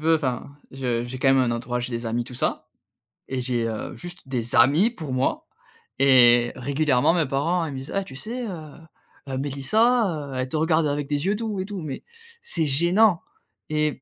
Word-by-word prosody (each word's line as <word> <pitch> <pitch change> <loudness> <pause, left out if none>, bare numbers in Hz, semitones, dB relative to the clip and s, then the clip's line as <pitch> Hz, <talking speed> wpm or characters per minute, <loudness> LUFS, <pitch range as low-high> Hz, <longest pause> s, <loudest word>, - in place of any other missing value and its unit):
veux 160 +1 +4
enfin, 140 -1 -4 0.2
je 125 -3 -2
j'ai 130 +2 -7
quand 135 - +2
même 135 - +5
un 125 -2 +2
entourage, 125 +1 -3
et 125 - -8
des 115 0 -3
amis, 120 +1 -1
tout 125 - -10
ça. 125 - -2 0.6
Et 130 -1 -3
j'ai, 120 -2 -1
heu, 110 -1 -5
juste 175 -4 -9
des 120 -3 -3
amis 145 - +6
pour 160 - -7
moi 130 +1 0 0.5
et 120 -3 +6
régulièrement 140 +2 +2
mes 170 -3 +2
parents 165 +6 0
ils 150 - -5
me - - -5
disent: 135 +2 -7
«Eh 195 - +1
tu 130 - -11
sais, 235 - -5
heu 160 -6 -7 0.6
heu, 130 - -3
Mélissa, 150 - +1
heu, - - -6
elle 130 0 -1
te - - -4
regarde 160 0 +2
avec 145 0 -2
des 145 +2 -1
yeux 200 +2 +2
doux 215 -3 -3
et 185 - -2
tout». 200 -3 -6
Mais 140 -4 -6 0.4
c'est 470 - -2
gênant 170 +7 +3 0.5
et 150 -3 0
140 Hz, 205 wpm, -24 LUFS, 130-170 Hz, 0.6 s, amis